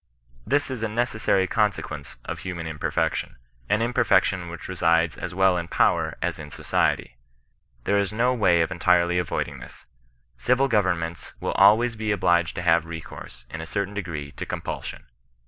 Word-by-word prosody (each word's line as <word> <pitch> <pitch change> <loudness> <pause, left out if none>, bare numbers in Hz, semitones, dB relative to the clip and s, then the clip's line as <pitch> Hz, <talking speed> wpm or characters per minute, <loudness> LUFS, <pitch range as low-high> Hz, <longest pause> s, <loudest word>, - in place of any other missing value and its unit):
This 145 +2 +1
is 125 -4 -4
a 115 - 0
necessary 110 -4 +1
consequence 95 - -2
of - - -5
human 90 -3 -5
imperfection; 80 -4 -2 0.3
an 105 +3 +2
imperfection 115 -7 +2
which 85 -1 -8
resides 85 -2 +2
as 90 -1 -6
well 95 -1 +4
in 85 - -5
power - - +1
as - - -2
in 75 - -8
society. - - -1 0.7
There 100 +7 +2
is 100 0 0
no 120 +4 +2
way 90 -8 +3
of 80 - 0
entirely 90 -1 +3
avoiding 90 - -3
this; - - -12 0.5
civil 125 +2 +2
govern 100 -7 +2
ments 85 0 -6
will - - -2
always 110 +4 +5
be 110 0 -2
obliged 85 -4 +2
to 85 - -4
have 85 -1 +3
recourse, 80 -6 -9
in 80 - -5
a 80 - -7
cer 100 +4 -1
tain 100 - -12
degree, 85 -8 -5
to - - -4
compulsion. - - -5
90 Hz, 170 wpm, -25 LUFS, 85-110 Hz, 0.7 s, always